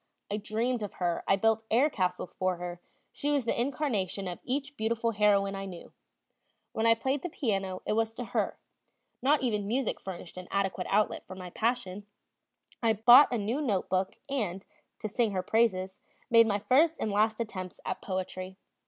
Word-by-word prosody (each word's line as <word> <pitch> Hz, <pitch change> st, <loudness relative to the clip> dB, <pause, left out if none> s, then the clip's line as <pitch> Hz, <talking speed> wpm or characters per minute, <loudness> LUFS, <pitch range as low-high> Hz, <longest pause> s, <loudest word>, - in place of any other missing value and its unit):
I 205 Hz, -, 0 dB
dreamed 225 Hz, +3 st, -1 dB
of 205 Hz, -, -4 dB
her, 175 Hz, -2 st, -1 dB
I 195 Hz, -, +5 dB
built 225 Hz, +2 st, +2 dB
air 250 Hz, +6 st, +4 dB
castles 180 Hz, -9 st, -2 dB
for 185 Hz, -1 st, 0 dB
her, 175 Hz, 0 st, -6 dB, 0.3 s
she 290 Hz, -, -3 dB
was 285 Hz, -4 st, +1 dB
the 235 Hz, -, 0 dB
incarnation 240 Hz, -, -1 dB
of 175 Hz, -, -5 dB
each 275 Hz, +2 st, -2 dB
beautiful 230 Hz, 0 st, 0 dB
heroine 200 Hz, -2 st, +3 dB
I 195 Hz, 0 st, -4 dB
knew; 180 Hz, -3 st, -10 dB, 0.8 s
when 225 Hz, +1 st, 0 dB
I 230 Hz, -, +6 dB
played 265 Hz, +4 st, -1 dB
the 355 Hz, -, -4 dB
piano, 195 Hz, -, -2 dB
it -, -, 0 dB
was 225 Hz, 0 st, 0 dB
to 245 Hz, -, -4 dB
her, -, -, -1 dB, 0.6 s
not 280 Hz, +2 st, +3 dB
even 210 Hz, -5 st, 0 dB
music 245 Hz, +2 st, 0 dB
furnished 180 Hz, -2 st, -8 dB
an 180 Hz, -1 st, -7 dB
adequate 195 Hz, -2 st, -1 dB
outlet 210 Hz, +2 st, +1 dB
for 185 Hz, -, -8 dB
my 180 Hz, -1 st, -8 dB
passion; 210 Hz, -4 st, -2 dB, 0.7 s
I 225 Hz, -2 st, +3 dB
bought 240 Hz, +7 st, +8 dB
a 245 Hz, -, +1 dB
new 225 Hz, +7 st, -1 dB
note 205 Hz, -10 st, 0 dB
book 185 Hz, +1 st, 0 dB
and, 205 Hz, -9 st, -2 dB, 0.4 s
to 215 Hz, -, -2 dB
sing 220 Hz, 0 st, 0 dB
her 185 Hz, -1 st, -1 dB
praises, 190 Hz, -3 st, +1 dB, 0.3 s
made 230 Hz, -1 st, +7 dB
my 205 Hz, -2 st, +1 dB
first 295 Hz, +10 st, +3 dB
and 215 Hz, -, -1 dB
last 215 Hz, +2 st, +2 dB
attempts 190 Hz, -5 st, -5 dB
at -, -, -3 dB
poetry. 185 Hz, 0 st, -4 dB
215 Hz, 185 wpm, -29 LUFS, 190-235 Hz, 0.8 s, bought